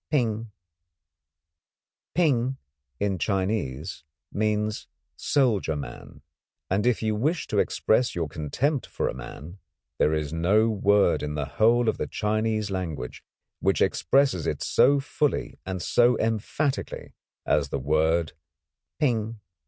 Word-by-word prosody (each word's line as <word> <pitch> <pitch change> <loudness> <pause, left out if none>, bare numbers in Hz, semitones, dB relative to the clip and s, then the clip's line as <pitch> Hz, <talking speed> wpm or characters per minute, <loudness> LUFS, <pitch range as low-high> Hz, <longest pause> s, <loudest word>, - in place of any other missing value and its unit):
"Ping" 115 -6 0 1.7
in 100 - -1
Chinese 95 -7 -2 0.3
means 105 0 -1 0.3
soldier 115 - +1
man, 70 -4 -8 0.5
and 100 +4 +2
if 120 -2 +1
you 110 -1 +1
wish 150 +8 0
to 105 - 0
express 120 +5 +1
your 85 -2 -1
contempt 120 - -1
for - - -2
a - - -2
man 70 +8 -9 0.4
there 75 - +4
is 75 -1 -3
no 100 +7 +3
word 100 -3 +3
in 75 0 -3
the 75 -1 -1
whole 115 - +3
of 110 - 0
the - - -2
Chinese 110 -1 -1
language 80 -9 -4 0.4
which - - +1
expresses 135 - +2
it - - -2
so 140 +1 +4
fully 145 +1 -1
and 95 -2 -3
so 120 -1 +4
emphatically 115 +6 -2 0.3
as 70 -2 +1
the - - -2
word 80 +4 +1 0.7
"Ping." 115 -6 0
105 Hz, 120 wpm, -26 LUFS, 80-115 Hz, 1.7 s, there